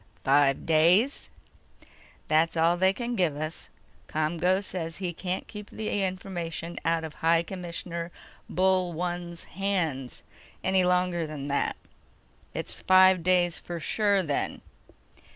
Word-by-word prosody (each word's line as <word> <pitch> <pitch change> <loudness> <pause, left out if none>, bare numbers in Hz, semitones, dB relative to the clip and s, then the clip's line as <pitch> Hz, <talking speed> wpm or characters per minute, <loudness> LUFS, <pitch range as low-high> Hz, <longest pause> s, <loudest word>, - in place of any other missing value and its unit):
"Five 135 0 +3
days?" 175 - +3 1.0
"That's 160 +2 +2
all 165 +2 +4
they 190 +2 +4
can 240 +4 -3
give 175 -8 +1
us. 155 +2 -4 0.4
ComGO 170 +5 +1
says 165 -4 -5
he 180 -3 -3
can't 180 +2 -3
keep 210 -1 -9
the 215 -2 -2
information 175 -3 -4
out 165 0 +1
of 160 -1 -6
High 165 +1 +2
Commissioner 170 -1 -5 0.4
Bullone's 175 -1 0
hands 170 -10 -2 0.4
any 190 0 +3
longer 180 -2 +1
than 145 -2 -6
that." 140 - 0 0.8
"It's - - -4
five 185 -1 +6
days 175 -1 +2
for 175 -1 -6
sure 200 +3 +1
then." 145 -4 -2
175 Hz, 120 wpm, -27 LUFS, 165-185 Hz, 1.0 s, five